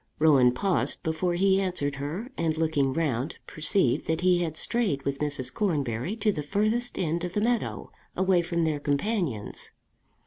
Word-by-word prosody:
Rowan 140 -6 +5
paused 185 +8 0
before 165 +2 0
he 195 +2 +3
answered 145 -7 -1
her, 165 - -5
and 160 -1 -1
looking 155 -4 +1
round 140 -2 -1
perceived 155 - +1
that 160 +1 0
he 180 -1 +4
had 160 -3 -2
strayed 200 -14 0
with 140 0 -2
Mrs. 145 -4 -2
Cornbury 145 - -1
to 215 -1 +1
the 150 - -3
furthest 215 +10 0
end 170 0 -1
of 180 0 -4
the 210 - +1
meadow, 235 +1 -1 0.3
away 185 -1 +3
from 170 -1 -1
their 155 -2 0
companions. 145 - -1
165 Hz, 165 wpm, -27 LUFS, 145-190 Hz, 0.3 s, Rowan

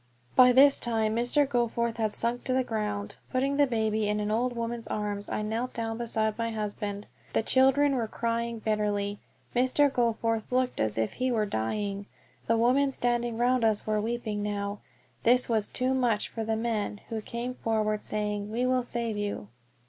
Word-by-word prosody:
By 250 -1 +8
this 275 +2 +6
time 220 -2 0
Mr. 245 +5 +2
Goforth 235 -2 0
had 215 -2 -1
sunk 235 +1 -1
to 255 - 0
the 260 0 +2
ground. 210 -3 -3
Putting 275 +2 +1
the 285 -1 +5
baby 220 -3 0
in 210 0 0
an 210 0 -1
old 245 +3 +1
woman's 230 -1 -3
arms, 205 -1 -3
I 215 - -2
knelt 225 +4 -2
down 225 0 -3
beside 220 -2 -1
my 230 0 0
husband. 210 -2 -4 0.3
The - - +2
children 270 +4 +4
were 235 -3 -1
crying 235 +1 -2
bitterly. 205 -2 -1 0.4
Mr. 260 +3 +3
Goforth 230 -2 0
looked 255 0 0
as 110 -1 0
if 110 -1 0
he 255 0 -1
were 220 -3 +1
dying. 200 - -2 0.4
The 230 - +3
women 255 +5 +3
standing 240 -3 -1
round 245 +1 +2
us 220 -2 +2
were 215 -1 +1
weeping 220 -2 -2
now. 205 0 -3 0.4
This 250 +2 +4
was 220 -3 +1
too 255 +1 0
much 240 -5 +1
for 225 - -4
the 220 0 0
men, 220 -2 -2
who 225 -1 -3
came 235 +3 -4
forward 215 -3 0
saying, 210 -1 -2
"We 240 +3 0
will 255 0 +2
save 235 -3 -3
you." 205 - -3
225 Hz, 180 wpm, -28 LUFS, 210-245 Hz, 0.4 s, By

